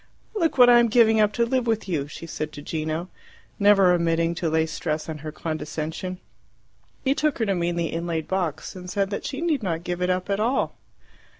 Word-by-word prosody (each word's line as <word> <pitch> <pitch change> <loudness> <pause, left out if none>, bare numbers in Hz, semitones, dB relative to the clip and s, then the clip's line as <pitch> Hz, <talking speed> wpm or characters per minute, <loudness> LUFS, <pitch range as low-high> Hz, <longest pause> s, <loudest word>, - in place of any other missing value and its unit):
"Look 335 -9 0
what 250 -1 +8
I 240 -1 +8
am 235 - +4
giving 225 -1 +5
up 210 -1 +3
to 235 - +2
live 250 0 0
with 225 -3 0
you!" 150 -6 -1
she 145 - -9
said 155 -2 -4
to 145 - -8
Gino, 160 +3 -3 0.5
never 200 -3 +6
omitting 165 -1 +1
to 170 -1 -2
lay 160 0 +2
stress 155 -1 -3
on 155 -2 -5
her 155 +1 -6
condescension. 160 +3 -4 0.9
He 265 - +3
took 305 0 0
her 225 - 0
to 200 - +1
mean 175 -1 -1
the 170 -1 -2
inlaid 165 -1 -2
box, 185 -2 -2
and 180 -1 -8
said 195 +2 -1
that 200 - -4
she 275 +2 -5
need 320 -6 +1
not 170 -4 -2
give 175 0 -3
it 180 - +1
up 185 0 0
at 200 - 0
all. 240 +5 +1
180 Hz, 215 wpm, -24 LUFS, 160-220 Hz, 0.9 s, what